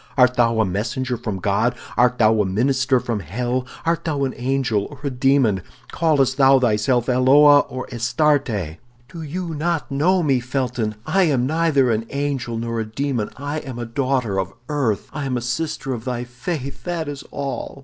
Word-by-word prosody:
"Art 125 Hz, -1 st, +5 dB
thou 115 Hz, -2 st, +2 dB
a 110 Hz, -, +4 dB
messenger 120 Hz, +7 st, -2 dB
from 110 Hz, -4 st, -4 dB
God; 100 Hz, +5 st, +1 dB, 0.2 s
art 125 Hz, 0 st, +3 dB
thou 110 Hz, -1 st, +4 dB
a -, -, +1 dB
minister 130 Hz, +6 st, +2 dB
from 120 Hz, -3 st, -3 dB
hell; 120 Hz, -, -2 dB, 0.2 s
art 165 Hz, 0 st, 0 dB
thou 145 Hz, -4 st, -1 dB
an 130 Hz, -, -1 dB
angel 125 Hz, -5 st, 0 dB
or 145 Hz, -, -12 dB
a 140 Hz, -, 0 dB
demon; 125 Hz, -6 st, +2 dB, 0.3 s
callest 140 Hz, -5 st, +2 dB
thou 135 Hz, -1 st, +6 dB
thyself 120 Hz, +1 st, +1 dB
Eloa 140 Hz, +3 st, +6 dB
or 130 Hz, 0 st, -5 dB
Astarte?" 115 Hz, -, 0 dB, 0.3 s
"Do 170 Hz, -2 st, -8 dB
you 165 Hz, +2 st, -4 dB
not 160 Hz, 0 st, -2 dB
know 175 Hz, +6 st, +2 dB
me, 135 Hz, -4 st, +2 dB
Felton? 125 Hz, -3 st, -2 dB
I 190 Hz, -1 st, +3 dB
am 135 Hz, -6 st, +1 dB
neither 150 Hz, -4 st, +2 dB
an 115 Hz, +1 st, -1 dB
angel 140 Hz, -5 st, -2 dB
nor 115 Hz, 0 st, -3 dB
a -, -, 0 dB
demon; 120 Hz, 0 st, -2 dB
I 145 Hz, +3 st, -3 dB
am 130 Hz, -5 st, -8 dB
a 120 Hz, -, -4 dB
daughter 125 Hz, -4 st, -1 dB
of 95 Hz, 0 st, -3 dB, 0.2 s
earth, 135 Hz, -9 st, -1 dB
I 145 Hz, -2 st, -4 dB
am 125 Hz, -2 st, -1 dB
a -, -, -3 dB
sister 135 Hz, +2 st, -3 dB
of 115 Hz, -3 st, -6 dB
thy 125 Hz, -1 st, -3 dB
faith, 135 Hz, +3 st, -5 dB
that 170 Hz, -3 st, -2 dB
is 145 Hz, -1 st, -6 dB
all." 140 Hz, 0 st, -5 dB
130 Hz, 185 wpm, -21 LUFS, 115-145 Hz, 0.3 s, thou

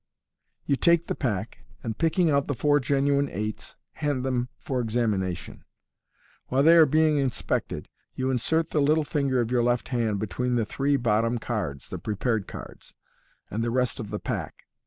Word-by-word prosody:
You 140 Hz, -, +2 dB
take 170 Hz, +3 st, +3 dB
the -, -, -2 dB
pack, 110 Hz, -5 st, -3 dB, 0.2 s
and 115 Hz, -2 st, -3 dB
picking 165 Hz, -, +2 dB
out 140 Hz, 0 st, +2 dB
the 145 Hz, -, -1 dB
four 145 Hz, +4 st, +3 dB
genuine 140 Hz, +1 st, +1 dB
eights, 105 Hz, +3 st, -5 dB, 0.2 s
hand 145 Hz, -4 st, -2 dB
them 125 Hz, -1 st, -1 dB
for 130 Hz, -2 st, -3 dB
examination. 110 Hz, -6 st, -2 dB, 0.8 s
While 135 Hz, +2 st, +2 dB
they 165 Hz, +2 st, +7 dB
are 160 Hz, -2 st, +8 dB
being 155 Hz, +1 st, +3 dB
inspected, 135 Hz, -3 st, -2 dB, 0.3 s
you 130 Hz, 0 st, 0 dB
insert 160 Hz, +6 st, 0 dB
the 150 Hz, -, +2 dB
little 155 Hz, +2 st, +3 dB
finger 140 Hz, -4 st, 0 dB
of 115 Hz, 0 st, -2 dB
your 125 Hz, -1 st, +3 dB
left 120 Hz, 0 st, 0 dB
hand 115 Hz, -5 st, 0 dB
between 120 Hz, +5 st, -1 dB
the 115 Hz, -2 st, +1 dB
three 140 Hz, +5 st, 0 dB
bottom 115 Hz, 0 st, +1 dB
cards 90 Hz, -, -4 dB
(the -, -, -5 dB
prepared 105 Hz, -1 st, -1 dB
cards) -, -, -10 dB, 0.6 s
and 110 Hz, +3 st, -1 dB
the 120 Hz, -, 0 dB
rest 125 Hz, 0 st, 0 dB
of 110 Hz, -3 st, -5 dB
the 105 Hz, -, -3 dB
pack. -, -, -5 dB
125 Hz, 175 wpm, -26 LUFS, 110-145 Hz, 0.8 s, are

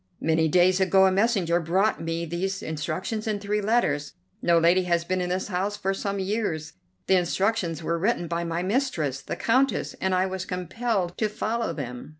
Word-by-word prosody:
Many 160 Hz, 0 st, +2 dB
days 180 Hz, +3 st, +4 dB
ago 190 Hz, 0 st, +5 dB
a 190 Hz, -, +4 dB
messenger 190 Hz, -4 st, +2 dB
brought 190 Hz, +6 st, +1 dB
me 165 Hz, +1 st, -2 dB
these 190 Hz, +4 st, -3 dB
instructions 170 Hz, +8 st, -3 dB
and 210 Hz, -2 st, -1 dB
three 210 Hz, +1 st, -1 dB
letters. 210 Hz, -9 st, +1 dB, 0.3 s
No 170 Hz, -1 st, +4 dB
lady 175 Hz, +3 st, +4 dB
has 170 Hz, -1 st, +1 dB
been 185 Hz, +1 st, -1 dB
in 180 Hz, -, -2 dB
this 185 Hz, +3 st, -2 dB
house 200 Hz, +2 st, -1 dB
for 195 Hz, -1 st, -1 dB
some 200 Hz, +1 st, -3 dB
years; 190 Hz, -6 st, -2 dB, 0.3 s
the 190 Hz, -, +4 dB
instructions 180 Hz, -2 st, 0 dB
were 170 Hz, +1 st, -1 dB
written 195 Hz, -2 st, 0 dB
by 170 Hz, +1 st, -2 dB
my 170 Hz, +1 st, -2 dB
mistress, 185 Hz, -, -1 dB
the -, -, -5 dB
Countess, 255 Hz, +1 st, +1 dB
and 190 Hz, -1 st, +1 dB
I 185 Hz, +1 st, +2 dB
was 190 Hz, -1 st, -3 dB
compelled 185 Hz, +1 st, -2 dB
to 215 Hz, -, +1 dB
follow 220 Hz, -1 st, -2 dB
them." 125 Hz, -6 st, -6 dB
185 Hz, 185 wpm, -26 LUFS, 170-205 Hz, 0.3 s, ago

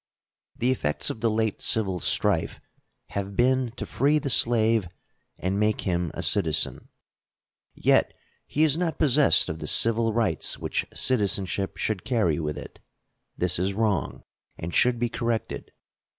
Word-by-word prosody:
The 125 Hz, +2 st, +1 dB
effects 75 Hz, -11 st, 0 dB
of 110 Hz, -, -9 dB
the 115 Hz, -, +2 dB
late 110 Hz, -1 st, -1 dB
civil 95 Hz, -5 st, +1 dB
strife -, -, 0 dB, 0.5 s
have 100 Hz, 0 st, -5 dB
been 130 Hz, +1 st, +2 dB
to -, -, -5 dB
free 145 Hz, +4 st, +1 dB
the 145 Hz, -3 st, -1 dB
slave 115 Hz, -4 st, +3 dB, 0.5 s
and 95 Hz, +2 st, -2 dB
make 105 Hz, 0 st, +1 dB
him 85 Hz, -2 st, -1 dB
a -, -, -4 dB
citizen. 80 Hz, -7 st, +1 dB, 0.9 s
Yet -, -, +2 dB, 0.4 s
he 155 Hz, -, 0 dB
is 155 Hz, +1 st, +1 dB
not 170 Hz, -3 st, -2 dB
possessed 145 Hz, -1 st, +4 dB
of 80 Hz, -, -5 dB
the -, -, -6 dB
civil 115 Hz, 0 st, +2 dB
rights 115 Hz, -1 st, 0 dB
which -, -, -3 dB
citizenship 100 Hz, -5 st, 0 dB
should 105 Hz, -4 st, -2 dB
carry 105 Hz, -, 0 dB
with 75 Hz, -2 st, -4 dB
it. -, -, -10 dB, 0.6 s
This 90 Hz, 0 st, -1 dB
is 95 Hz, +2 st, -1 dB
wrong, 105 Hz, -4 st, -1 dB, 0.3 s
and 85 Hz, +2 st, -6 dB
should 125 Hz, 0 st, +3 dB
be 120 Hz, +1 st, 0 dB
corrected. 115 Hz, -1 st, -4 dB
110 Hz, 150 wpm, -25 LUFS, 95-120 Hz, 0.9 s, possessed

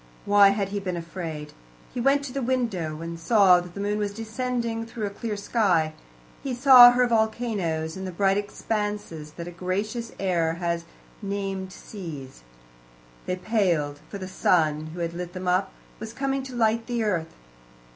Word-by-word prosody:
Why 205 Hz, 0 st, +7 dB
had 200 Hz, -1 st, 0 dB
he 205 Hz, +1 st, -2 dB
been 185 Hz, -3 st, -3 dB
afraid? 165 Hz, -3 st, -6 dB, 0.4 s
He 245 Hz, -, -2 dB
went 275 Hz, +3 st, +3 dB
to 265 Hz, -3 st, -6 dB
the 275 Hz, -, -2 dB
window, 215 Hz, -12 st, -1 dB
and 170 Hz, 0 st, -6 dB
saw 190 Hz, -1 st, +5 dB
that 175 Hz, 0 st, -9 dB
the -, -, -6 dB
moon 205 Hz, +1 st, -1 dB
was 205 Hz, -1 st, -1 dB
descending 230 Hz, 0 st, -2 dB
through 225 Hz, -1 st, -5 dB
a 200 Hz, -, -3 dB
clear 210 Hz, +1 st, -4 dB
sky. 185 Hz, -7 st, +1 dB, 0.5 s
He 265 Hz, -3 st, -3 dB
saw 250 Hz, -1 st, +10 dB
her 245 Hz, +1 st, +3 dB
volcanoes, 220 Hz, -9 st, 0 dB
and 190 Hz, 0 st, -5 dB
the -, -, -4 dB
bright 195 Hz, +2 st, +2 dB
expanses 205 Hz, -6 st, -3 dB
that 170 Hz, +1 st, -7 dB
a -, -, -6 dB
gracious 205 Hz, +7 st, -3 dB
error 170 Hz, -4 st, +1 dB
has 170 Hz, 0 st, -2 dB, 0.4 s
named 195 Hz, -2 st, -3 dB
seas. 160 Hz, -, -9 dB, 0.9 s
They 180 Hz, -, 0 dB
paled, 175 Hz, -8 st, 0 dB
for 200 Hz, -, -6 dB
the 190 Hz, -1 st, -6 dB
sun, 155 Hz, -4 st, +1 dB
who 175 Hz, -, -5 dB
had 170 Hz, 0 st, -2 dB
lit 175 Hz, 0 st, -6 dB
them 185 Hz, 0 st, -5 dB
up, 185 Hz, +2 st, +2 dB, 0.3 s
was 220 Hz, +1 st, -7 dB
coming 270 Hz, +1 st, -1 dB
to 260 Hz, -2 st, -8 dB
light 225 Hz, 0 st, +1 dB
the 240 Hz, -2 st, -1 dB
earth. 170 Hz, -6 st, -1 dB
200 Hz, 175 wpm, -25 LUFS, 170-225 Hz, 0.9 s, saw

